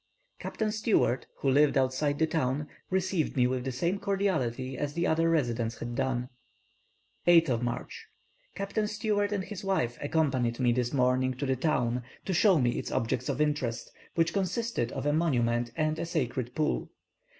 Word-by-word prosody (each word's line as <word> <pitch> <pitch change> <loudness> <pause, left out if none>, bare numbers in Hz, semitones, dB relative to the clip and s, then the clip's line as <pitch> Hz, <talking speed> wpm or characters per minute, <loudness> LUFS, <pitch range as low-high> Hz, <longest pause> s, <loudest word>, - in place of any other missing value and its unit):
Captain 215 -1 -2
Stewart, 210 - +1
who 135 - +2
lived 145 +1 +4
outside 135 +2 +1
the 160 - +3
town, 150 -2 -1 0.2
received 185 -5 0
me 125 - +5
with 125 0 0
the 130 - -2
same 170 +10 -1
cordiality 135 -12 -1
as 145 +1 -3
the 170 +2 0
other 165 0 +2
residents 120 -7 0
had 120 0 -5
done. 125 0 -1 1.0
8th 165 -9 +5
March. 120 -1 -4 0.5
Captain 200 +2 -1
Stewart 210 -1 0
and 200 -2 -1
his 205 0 -7
wife 155 -12 0
accompanied 135 -6 0
me 125 -2 +3
this 120 0 0
morning 130 -1 +2
to 140 - -3
the 130 -1 +1
town 125 -4 0 0.2
to 190 - -1
show 190 0 +5
me 120 -4 +1
its - - -5
objects 120 +3 -1
of 135 -1 -1
interest, 140 -6 -1 0.2
which 165 -1 +2
consisted 195 - -1
of 135 0 -4
a 145 - +2
monument 120 -7 +1
and 155 0 0
a 170 - -1
sacred 130 -6 -2
pool. 155 -1 0
145 Hz, 170 wpm, -29 LUFS, 125-170 Hz, 1.0 s, me